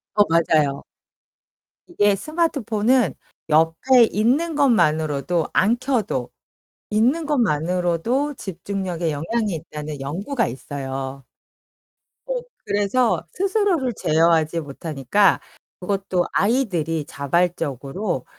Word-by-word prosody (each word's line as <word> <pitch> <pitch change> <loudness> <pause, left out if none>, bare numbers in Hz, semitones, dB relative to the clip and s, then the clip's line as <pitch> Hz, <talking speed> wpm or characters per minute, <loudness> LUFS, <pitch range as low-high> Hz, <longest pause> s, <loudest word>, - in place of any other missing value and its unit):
어 205 - +6
맞아요. 155 -4 +2 1.0
이게 205 - +2
스마트폰은 250 - +1 0.4
옆에 165 +12 +4
있는 280 +10 +1
것만으로도 160 - +2
안 225 +5 +3
켜도 225 - -1 0.6
있는 250 +10 +2
것만으로도 185 - 0
집중력에 180 -4 -4
영향이 205 +7 -1
있다는 150 -2 -7
연구가 200 - -2
있어요. 135 0 -6 1.0
어 - - -2 0.3
그래서 205 +4 +1
스스로를 380 - +1
제어하지 165 0 +2
못하니까 150 +5 +1 0.4
그것도 190 -1 -1
아이들이 180 - 0
자발적으로 160 - -2
185 Hz, 240 characters per minute, -22 LUFS, 155-240 Hz, 1.0 s, 어